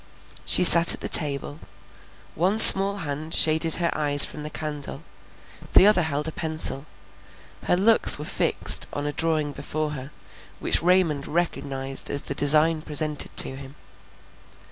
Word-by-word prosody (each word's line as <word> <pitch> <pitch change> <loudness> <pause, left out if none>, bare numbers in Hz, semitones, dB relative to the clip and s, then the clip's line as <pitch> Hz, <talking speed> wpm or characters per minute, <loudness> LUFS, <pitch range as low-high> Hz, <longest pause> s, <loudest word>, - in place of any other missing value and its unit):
She - - +2
sat 170 -1 +7
at - - -17
the - - -6
table; 145 0 -1 0.7
one 185 +6 -4
small 200 -2 +7
hand 150 +3 -6
shaded 160 +1 0
her 170 -1 -4
eyes 145 -2 +5
from 150 - -12
the 150 - -10
candle; 150 -2 -7 0.7
the - - +4
other 210 -3 +1
held 150 -1 -4
a - - -7
pencil; 155 -3 -3 0.8
her 180 - -2
looks 220 +4 +4
were 150 - -11
fixed - - +2
on 145 - -8
a 145 - -6
drawing 155 -1 -4
before 150 +2 -8
her, 135 -2 -11 0.5
which - - -3
Raymond 170 -5 -2
recognized 135 -5 -6
as 140 - -5
the - - -8
design 155 +3 -1
presented 150 -1 -3
to 130 - +4
him. 135 +1 -15
155 Hz, 150 wpm, -20 LUFS, 145-165 Hz, 0.8 s, sat